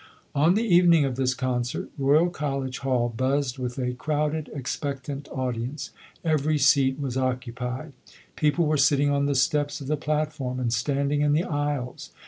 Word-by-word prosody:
On 155 +6 +4
the 220 - +2
evening 175 -6 +5
of 130 -2 -2
this 130 -1 0
concert, 125 -2 -2
Royal 150 +5 +3
College 135 -5 -3
Hall 130 -3 +1
buzzed 130 +1 0
with 125 0 -4
a 125 -1 -1
crowded, 150 +3 -1
expectant 140 +1 -4
audience. 130 +3 -3 0.3
Every 155 -1 +2
seat 135 -2 +4
was 130 -3 -3
occupied. 130 +2 -3 0.4
People 155 +2 +2
were 155 0 +2
sitting 140 +1 +3
on 140 0 +1
the 140 - 0
steps 145 +1 +1
of 140 - -8
the 150 +3 0
platform 150 -4 -2
and 120 -2 0
standing 140 +4 0
in 145 0 +3
the 160 +3 +2
aisles. 145 -6 -3
140 Hz, 160 wpm, -25 LUFS, 130-150 Hz, 0.4 s, evening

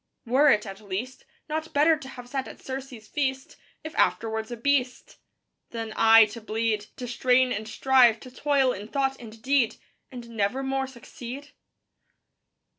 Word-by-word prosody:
Were 270 +5 +4
it, 210 -4 +3
at 195 0 -8
least; 210 +6 -6 0.2
Not 315 +1 -4
better 305 +3 +5
to 295 -3 -10
have 245 -2 -10
sat 265 +1 -3
at - - -11
Circe's 260 -4 -7
feast, 265 -2 -2 0.3
If 315 0 -7
afterwards 220 -1 0
a 240 - -6
beast? 255 0 -1 0.5
Than 225 -2 -5
aye 225 0 +7
to 230 - -8
bleed, 220 -1 -1
To 250 - -6
strain 250 +1 +2
and 215 -1 -3
strive, 245 -1 +4
to 255 - -11
toil 275 -1 +2
in 205 +2 -8
thought 270 +1 -1
and 225 -1 -11
deed, 265 -3 +2 0.4
And 240 -2 -9
nevermore 265 +5 -1
succeed? 265 +2 -9
250 Hz, 155 wpm, -26 LUFS, 225-270 Hz, 0.5 s, aye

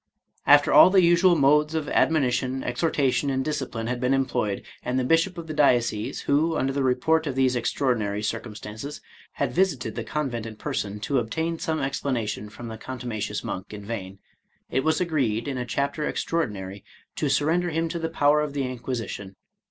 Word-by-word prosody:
After - - +6
all - - +9
the 185 -1 +5
usual 175 +1 +5
modes 150 +2 +3
of 155 -2 -1
admonition, 130 -3 +1
exhortation, 140 +1 0
and 135 -1 -1
discipline 135 -7 -3
had 120 +1 -2
been 130 +1 +2
employed, 120 -6 -1 0.2
and 125 - -2
the 130 - +1
bishop 165 +7 +2
of 170 - -6
the 155 - -5
diocese, 120 -7 +2
who, 155 +3 +1
under 135 +1 0
the 140 - -1
report 140 +5 +2
of 135 - -2
these 130 -1 +2
extraordinary 115 -4 0
circumstances, 110 +5 -5 0.3
had - - -2
visited 160 - +1
the 115 - -4
convent 120 -3 -3
in 110 - -8
person 105 -1 -3
to 135 +4 +1
obtain 160 +8 -2
some 160 -1 -1
explanation 125 -6 -2
from 120 +2 -9
the 110 -1 -7
contumacious 115 -5 -4
monk 95 +1 -5
in 100 -1 -9
vain, 100 -3 -5 0.5
it 130 - +1
was 160 0 +2
agreed, 135 -10 0
in 135 -2 -2
a 125 - -4
chapter 140 +4 -1
extraordinary, 100 - -3 0.3
to - - -1
surrender 170 +4 +2
him 165 +1 0
to 170 +1 -4
the 165 0 -2
power 150 -1 +3
of 150 -2 -3
the 140 -1 -1
Inquisition. 120 -6 -5
130 Hz, 180 wpm, -25 LUFS, 115-155 Hz, 0.5 s, all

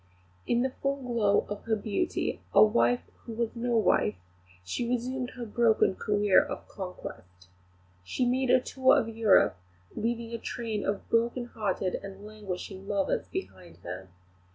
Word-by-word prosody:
In 240 +1 +2
the 260 - 0
full 275 0 +1
glow 225 -5 +2
of 205 0 -6
her 225 -1 +2
beauty, 215 - -2
a - - +9
wife 235 +3 +3 0.2
who 230 - -8
was 230 +1 -2
no 240 0 0
wife, 105 - +3 0.5
she 235 - -3
resumed 250 +1 -1
her 245 -2 -5
broken 225 -2 +3
career 205 -1 +4
of - - -7
conquest. 90 - -9 0.5
She 245 - -1
made 255 +1 +1
a 255 - +6
tour 260 +1 +3
of 225 - 0
Europe, 215 - +4 0.4
leaving 230 +1 -2
a 230 - -3
train 220 -4 -3
of 200 0 -2
broken 235 +2 +2
hearted 200 -5 -2
and 195 +1 -9
languishing 195 -2 -7
lovers 200 -2 0
behind 185 - -7
her. 90 +2 -7
220 Hz, 155 wpm, -29 LUFS, 195-240 Hz, 0.5 s, a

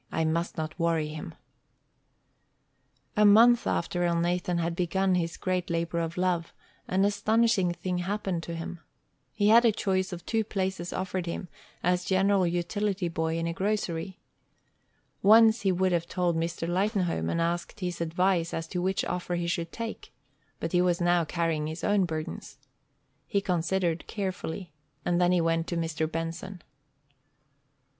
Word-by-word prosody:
I 160 - 0
must 165 +2 -1
not 160 +2 -4
worry 165 -2 +1
him." 150 - -7 1.8
A 210 - +4
month 230 +4 +6
after 175 +1 -1
Elnathan 175 +1 0
had 170 0 -1
begun 185 +2 +1
his 170 -2 -1
great 185 -1 -1
labor 170 0 -1
of 165 +1 -3
love, 180 -2 0 0.3
an 190 +2 +2
astonishing 205 -2 +2
thing 180 +1 -3
happened 190 -1 -2
to 170 0 -6
him. 165 +1 -6 0.5
He 205 -1 +2
had 230 +2 +7
a 230 - +5
choice 190 -2 -1
of 175 -1 -7
two 225 -1 +1
places 190 -4 -3
offered 185 -1 -3
him 170 +1 -4 0.3
as 180 0 +2
general 190 0 +3
utility 185 +2 -1
boy 160 0 -1
in 165 - -1
a 170 - -1
grocery. 190 -2 -2 1.0
Once 220 +2 +6
he 195 - +2
would 185 +1 +1
have 170 -1 0
told 175 -2 0
Mr. 165 0 -2
Lightenhome, 180 - 0
and - - 0
asked 170 +4 -2
his 180 -2 -3
advice 170 +1 +1
as 165 0 -4
to 180 - -2
which 190 +1 0
offer 180 0 -2
he 175 0 -2
should 170 -1 -2
take, 230 -1 -6 0.5
but - - -3
he 180 - +3
was 180 -1 +2
now 175 -1 +3
carrying 160 -2 -1
his 160 +2 -6
own 205 -2 +3
burdens. 160 -2 -6 0.7
He 200 - +1
considered 175 -2 -1
carefully, 185 -4 -4 0.3
and 175 0 +2
then 175 0 +4
he 180 -1 +3
went 165 0 +1
to 170 - -2
Mr. 160 -1 -2
Benson. 165 +3 -5
175 Hz, 160 wpm, -28 LUFS, 170-190 Hz, 1.8 s, had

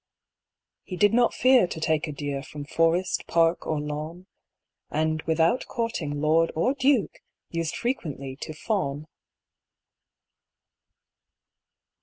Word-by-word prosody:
He 185 - -7
did 205 +4 +4
not 240 0 +4
fear 255 -6 +4
to 165 - -6
take 160 0 0
a - - -4
deer 145 -1 -4
From 145 0 -8
forest, 165 +4 +1
park, 165 0 +2
or 155 -2 0
lawn; 155 +4 -5 0.6
And 155 +1 0
without 165 +9 +2
courting 175 -12 -3
lord 160 +2 +3
or 170 +12 +2
duke, 265 -4 +1 0.3
Used 165 -1 -2
frequently 145 - -3
to 155 - -6
fawn. 155 -4 -2
165 Hz, 115 wpm, -26 LUFS, 150-190 Hz, 0.6 s, did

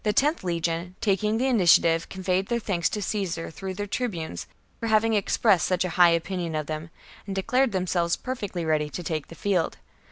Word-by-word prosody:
Ihe 210 0 +3
loth 300 - 0
legion, 170 0 -2
taking 210 +1 +1
the 250 - 0
initiative, 180 -9 +5
miles 165 0 0
from - - -28
conveyed 190 0 -1
their 235 - 0
thanks 180 -6 0
to 210 - -3
Caesar 180 -5 -3
through 190 +3 -6
their 205 +2 -3
tribunes 175 - -4 0.3
for 230 - -3
having 220 +1 +3
expressed 205 -2 +3
such 185 0 +1
a - - -2
high 175 0 +6
opinion 170 0 -1
of 155 -1 -1
them, 155 +1 -5 0.4
and 195 - -4
declared 250 +6 +2
themselves 180 -2 0
perfectly 205 -9 -4
ready 155 -1 +1
to 175 - -6
take 155 -3 -3
the 165 - -11
field. 185 -2 0
185 Hz, 200 wpm, -26 LUFS, 170-210 Hz, 0.4 s, high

